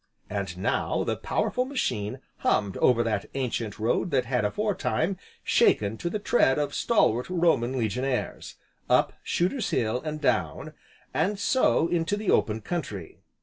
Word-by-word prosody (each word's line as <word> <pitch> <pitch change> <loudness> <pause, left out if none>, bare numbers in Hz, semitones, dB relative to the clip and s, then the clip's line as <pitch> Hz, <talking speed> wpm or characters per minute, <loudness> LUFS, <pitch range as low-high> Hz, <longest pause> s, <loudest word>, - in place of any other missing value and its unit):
And - - -3
now - - 0
the - - -1
powerful 250 - -1
machine 125 - -2 0.2
hummed 100 -3 +1
over 120 -2 +4
that 105 -3 -1
ancient 120 -5 -2
road 115 +11 0
that 130 -5 +1
had 125 -1 0
aforetime, 195 - 0 0.3
shaken 105 +1 +3
to 170 - -2
the 215 - -2
tread 200 - +3
of 145 -1 -1
stalwart 125 - +2
Roman 165 -8 +2
Legionaries, 125 +3 -2 0.3
up - - +3
Shooter's 195 +7 0
Hill, 115 +2 0
and 155 -1 -4
down, - - 0 0.4
and 195 +6 +1
so 200 -5 +2
into 170 +3 0
the 210 -2 0
open 110 0 +2
country. 105 - -5
135 Hz, 145 wpm, -27 LUFS, 115-180 Hz, 0.4 s, over